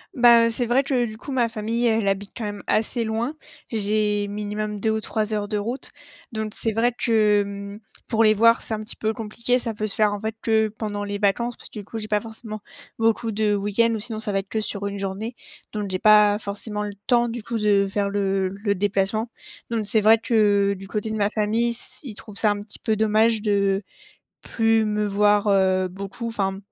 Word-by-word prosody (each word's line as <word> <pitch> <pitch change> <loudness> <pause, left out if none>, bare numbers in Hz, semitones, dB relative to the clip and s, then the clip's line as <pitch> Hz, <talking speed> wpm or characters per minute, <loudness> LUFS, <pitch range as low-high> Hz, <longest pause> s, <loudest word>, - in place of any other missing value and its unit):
Ben, 235 -2 +7
heu, 230 - 0
c'est 240 +1 -1
vrai 260 +3 +3
que 255 -3 +1
du 215 -1 -7
coup 275 - -8
ma 240 -3 +1
famille, 230 +2 -1
elle 220 -2 +1
habite 195 +1 -1
quand 230 - -4
même, 205 -1 -4
assez 230 +2 +1
loin. 225 +7 -2 0.4
J'ai 210 -1 +1
minimum 210 0 -4
2 220 +2 +1
ou 220 0 -1
3 215 0 -2
heures 205 -1 -1
de 210 0 -1
route. 235 +6 -3 0.4
Donc 220 -1 -4
c'est 225 - -1
vrai 230 +3 +2
que, 215 -4 +3
hem, 200 +1 -6 0.3
pour 225 -1 +2
les 215 0 +5
voir, 230 +2 +5
c'est 220 - -3
un 215 - -5
petit 215 - -2
peu 220 0 -1
compliqué, 230 +3 0
ça 235 -3 -3
peut 215 +1 -3
se 195 - -1
faire 210 -1 +3
en 205 - -5
fait 220 0 -3
que 220 -1 +3
pendant 205 -2 -3
les 205 0 -3
vacances 220 +4 0
parce - - -10
que 215 - -8
du - - -7
coup, 225 - -7
j'ai 215 -1 -4
pas 210 -1 +1
forcément 220 -1 -8 0.4
beaucoup 225 0 +1
de 210 0 +1
week-ends 205 +3 +1
ou - - -3
sinon 220 0 -3
ça 215 -1 -2
va 195 - 0
être 195 +1 -3
que 220 - -1
sur 200 -1 -4
une 200 0 -4
journée, 200 +5 -4 0.4
donc 205 -2 -3
j'ai 185 - 0
pas 210 -1 +6
forcément 210 0 -4
le 205 -1 -5
temps, 240 -1 +4
du 235 0 -5
coup, 230 +2 -3
de 205 -2 +3
faire 200 0 0
le 195 -2 0
le 200 +1 -2
déplacement, 205 +3 0 0.4
donc 220 -3 -1
c'est 215 0 +3
vrai 220 +2 +6
que 205 -3 +2
du 195 0 -10
côté 215 +2 -3
de 220 - -3
ma 205 0 +1
famille, 220 +2 +1
s 235 - -9
ils 250 -7 -7
trouvent 210 0 -10
ça 210 0 +3
un 205 0 -3
petit 210 0 -4
peu 220 - 0
dommage 220 +1 +3
de 200 -2 +1 0.6
plus 225 -1 +1
me 210 0 0
voir, 205 +1 +3
heu, 190 -1 +3
beaucoup, 195 +5 -6
enfin 195 -4 -2
215 Hz, 230 wpm, -23 LUFS, 205-225 Hz, 0.6 s, Ben